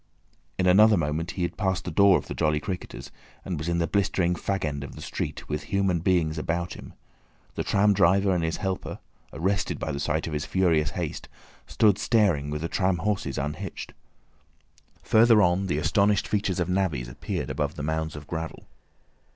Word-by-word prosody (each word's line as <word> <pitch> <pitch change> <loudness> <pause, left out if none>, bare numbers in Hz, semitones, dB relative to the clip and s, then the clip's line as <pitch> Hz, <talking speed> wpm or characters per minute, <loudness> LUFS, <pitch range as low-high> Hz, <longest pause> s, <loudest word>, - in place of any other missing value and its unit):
In 95 - +1
another 105 +3 +6
moment 80 +1 -1
he 90 - 0
had 85 - -3
passed 95 -3 -1
the - - -3
door 100 -2 +5
of - - -6
the - - -6
"Jolly 75 -1 +1
Cricketers," 90 +3 -6 0.3
and 90 -5 -3
was 80 +3 -3
in 85 - 0
the 85 - +1
blistering 95 -2 +1
fag 95 +1 -2
end 70 -2 -3
of 70 - -9
the - - -10
street, - - -5
with 75 0 -4
human 95 -2 +1
beings 80 -3 +1
about 85 +2 -2
him. - - -11 0.6
The - - -3
tram 100 +1 +3
driver 95 +1 +3
and 85 -2 0
his 80 0 -1
helper—arrested 95 0 -3
by - - -3
the 70 - -4
sight 75 +2 -1
of 80 - -5
his 75 0 -2
furious 85 -4 +2
haste—stood 95 +4 -1
staring 95 -11 +2
with 75 +1 -3
the - - 0
tram 95 +1 +1
horses 95 -6 -2
unhitched. 75 +2 -5 1.1
Further 115 0 +5
on 95 0 +2
the 75 - 0
astonished 100 +5 +2
features 100 -3 -1
of 90 - 0
navvies 90 -10 -1
appeared - - -4
above - - -2
the 75 - -6
mounds 80 +1 -2
of 75 0 -8
gravel. 80 +1 -6
90 Hz, 185 wpm, -26 LUFS, 80-95 Hz, 1.1 s, another